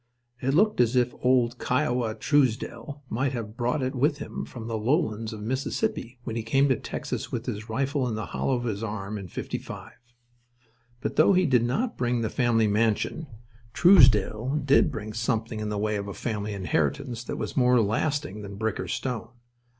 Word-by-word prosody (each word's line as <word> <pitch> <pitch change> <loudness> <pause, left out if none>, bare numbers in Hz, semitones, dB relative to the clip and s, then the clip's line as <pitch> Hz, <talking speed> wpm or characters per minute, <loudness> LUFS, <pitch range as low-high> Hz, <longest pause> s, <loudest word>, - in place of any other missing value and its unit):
It 135 +2 +1
looked 210 - +4
as 120 +1 +2
if 125 -1 +2
old 125 -1 +2
"Kiowa" 125 -4 0
Truesdell 140 +3 0
might 130 +4 -1
have 110 -3 -5
brought 125 +4 0
it 130 - -1
with 145 +3 +1
him 145 - -6
from 115 -3 -9
the 115 -1 -3
lowlands 110 -2 0
of 105 -1 -7
Mississippi 130 - -2
when 115 -2 -4
he 115 - -1
came 135 +5 +2
to 130 - +4
Texas - - -5
with 120 0 -3
his 110 -2 -5
rifle 135 +3 0
in 115 - -2
the 110 - -3
hollow 135 - -1
of 120 - -3
his 110 -4 -2
arm 105 -1 -4
in 95 - -7
'55. - - -6 1.1
But, - - -3
though - - +6
he 185 0 +4
did 125 -6 +3
not 220 - -1
bring 120 -1 +1
the 110 - -2
family 120 -3 +2
mansion, 110 +9 0 0.5
Truesdell 130 - +5
did 140 0 +5
bring 110 0 -6
something 115 0 -1
in 105 0 -3
the 105 - -2
way 105 0 0
of 100 0 -4
a 100 - -6
family 105 -3 -3
inheritance 120 - -1
that - - -4
was - - -4
more 125 -1 +4
lasting 115 +3 -1
than 100 -1 -8
brick 110 0 -2
or - - -3
stone. 120 -3 -3
120 Hz, 190 wpm, -26 LUFS, 110-135 Hz, 1.1 s, though